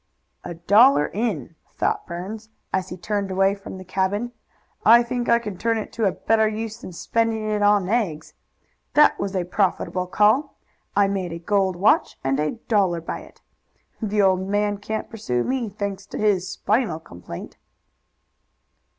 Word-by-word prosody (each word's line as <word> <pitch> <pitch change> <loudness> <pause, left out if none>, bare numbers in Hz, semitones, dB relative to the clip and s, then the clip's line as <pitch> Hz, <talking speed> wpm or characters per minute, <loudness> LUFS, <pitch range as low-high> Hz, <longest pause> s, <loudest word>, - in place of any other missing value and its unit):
"A 175 - -6
dollar 205 - +5
in!" 215 -5 -2 0.2
thought - - -1
Burns, 205 +6 -6 0.2
as 190 -1 -1
he 180 - -7
turned 200 +2 -2
away 195 +1 +2
from 200 -1 -9
the 185 - -9
cabin. 195 +6 -1 0.5
"I 235 +2 +7
think 240 0 -3
I 235 - +6
can 210 -6 -6
turn 230 0 +1
it 215 - -6
to 225 - 0
a 195 - +3
better 220 +2 +2
use 220 +1 -4
than - - -8
spending 225 +4 -1
it 210 -1 0
in 205 -2 +4
eggs. 190 -9 -1 0.6
That 300 - +5
was 200 0 -3
a 185 - +1
profitable 180 0 -1
call. 215 +10 +2 0.4
I 200 0 +4
made 190 -3 -2
a - - -4
gold 190 +2 +1
watch 200 +5 +2
and 135 +1 0
a 150 0 0
dollar 195 -6 +2
by 165 - -5
it. - - -16 0.6
The 210 -1 +1
old 185 -1 +3
man 205 0 0
can't 220 +1 -4
pursue 125 - -2
me, 255 -4 -1
thanks 200 -1 -5
to - - -7
his 200 -4 +1
spinal 210 -6 0
complaint." 85 - -10
205 Hz, 165 wpm, -23 LUFS, 185-220 Hz, 0.6 s, I